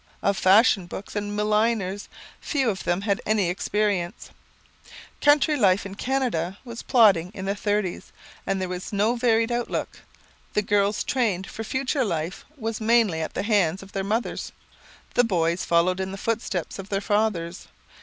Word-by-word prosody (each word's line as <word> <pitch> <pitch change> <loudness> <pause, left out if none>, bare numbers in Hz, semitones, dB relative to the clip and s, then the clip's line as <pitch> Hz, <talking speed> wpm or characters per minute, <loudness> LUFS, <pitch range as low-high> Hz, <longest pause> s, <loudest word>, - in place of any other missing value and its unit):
Of 200 - +2
fashion 195 -1 +4
books 195 +5 -8
and 205 0 -3
milliners, 210 -2 0 0.3
few 270 -6 0
of 190 - -7
them 175 +2 +1
had 200 -1 0
any 205 -5 +1
experiences. 195 -2 -1 0.9
Country 295 +1 +4
life 200 -6 +3
in 195 - -6
Canada 205 -7 -1
was 235 -1 -7
plodding 200 -8 +4
in 190 - -5
the 195 - 0
"Thirties" 205 -3 -2 0.4
and 195 0 0
there 185 - -2
was 180 +1 -5
no 210 +4 +2
varied 230 -1 +2
outlook. 240 0 -3 0.5
The 210 - +1
girls' 205 0 +1
training 220 -9 0
for 225 - -5
future 265 +4 -1
life 170 -4 -3
was 225 -2 -4
mainly 220 -7 +3
at 160 - -5
the - - -1
hands 195 -4 +1
of 195 - -14
their 195 - -2
mothers; 220 +4 -2 0.6
the 245 - +4
boys 170 -5 0
followed 175 +2 +2
in 190 0 -3
the 195 - -6
footsteps 200 -5 -3
of 195 +1 -8
their 195 - 0
fathers. 200 -5 -1
205 Hz, 165 wpm, -25 LUFS, 185-225 Hz, 0.9 s, fashion